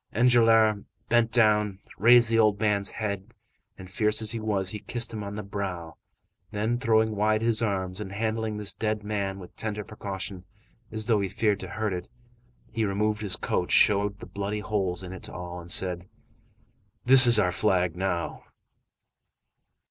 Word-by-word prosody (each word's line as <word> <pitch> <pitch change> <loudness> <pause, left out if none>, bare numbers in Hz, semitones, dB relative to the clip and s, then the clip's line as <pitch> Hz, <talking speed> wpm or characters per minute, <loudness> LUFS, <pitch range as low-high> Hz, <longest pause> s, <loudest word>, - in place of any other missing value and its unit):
Enjolras 115 -3 +4 0.3
bent 120 -1 +2
down, 105 -4 +2 0.2
raised 120 +2 +6
the 115 0 +1
old 105 -2 +3
man's 105 -2 +2
head, 105 +1 -5 0.4
and 95 - -11
fierce 105 +3 0
as 110 -1 +2
he 115 - -3
was, 100 -4 -1
he 105 - -6
kissed 115 +2 -4
him 105 -2 -5
on 100 0 -7
the 105 - -5
brow, 95 -4 -6 0.5
then, 110 +3 -2
throwing 110 -3 +1
wide 110 +1 +1
his 115 -1 +2
arms, 95 -3 -2
and 95 -2 -7
handling 110 +1 -3
this 105 -1 -2
dead 110 -1 -3
man 100 -2 -3
with 90 -2 -13
tender 105 -1 -4
precaution, 95 -3 -7 0.5
as 110 -1 -2
though 110 -2 +2
he 100 -1 -2
feared 105 +1 0
to 95 - -6
hurt 110 +1 -3
it, 90 -1 -6 0.6
he 115 0 -2
removed 105 +1 -1
his 100 -3 +1
coat, - - -2
showed 100 0 +3
the - - -11
bloody 100 +1 -5
holes 95 -4 -2
in 90 0 -8
it 95 - -9
to - - -8
all, 90 0 -7
and 85 - -13
said:— 90 0 0 1.0
"This 130 0 +10
is 120 - +7
our 90 - +2
flag 90 -3 0
now." 90 -2 -3
105 Hz, 175 wpm, -26 LUFS, 95-110 Hz, 1.0 s, This